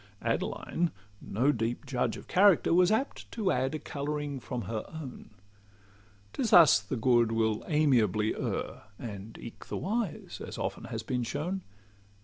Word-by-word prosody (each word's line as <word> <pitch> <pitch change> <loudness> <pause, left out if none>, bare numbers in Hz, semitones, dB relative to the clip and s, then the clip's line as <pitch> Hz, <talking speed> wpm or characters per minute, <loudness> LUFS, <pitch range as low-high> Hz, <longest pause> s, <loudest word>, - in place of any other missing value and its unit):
Adeline, 175 0 -1 0.3
no 125 +8 +1
deep 115 +1 -2
judge 125 -3 -1
of - - -12
character, 195 -3 +5
Was 180 +2 +5
apt 225 +6 -1
to 210 -5 +1
add 130 +3 0
a - - 0
colouring 145 -1 -4
from 125 -1 -4
her 110 -1 -3
own: 155 -6 -8 1.0
'Tis 240 - -1
thus 160 - +8
the 105 +5 -4
good 120 -1 +3
will 110 -1 +1
amiably 115 - +2
err, - - -4
And 105 -2 -8
eke 115 - -10
the - - -3
wise, 210 -2 -3
as - - -7 0.3
has 110 -1 -4
been 125 +2 -1
often - - -1
shown. 165 +10 -3
130 Hz, 150 wpm, -30 LUFS, 115-165 Hz, 1.0 s, thus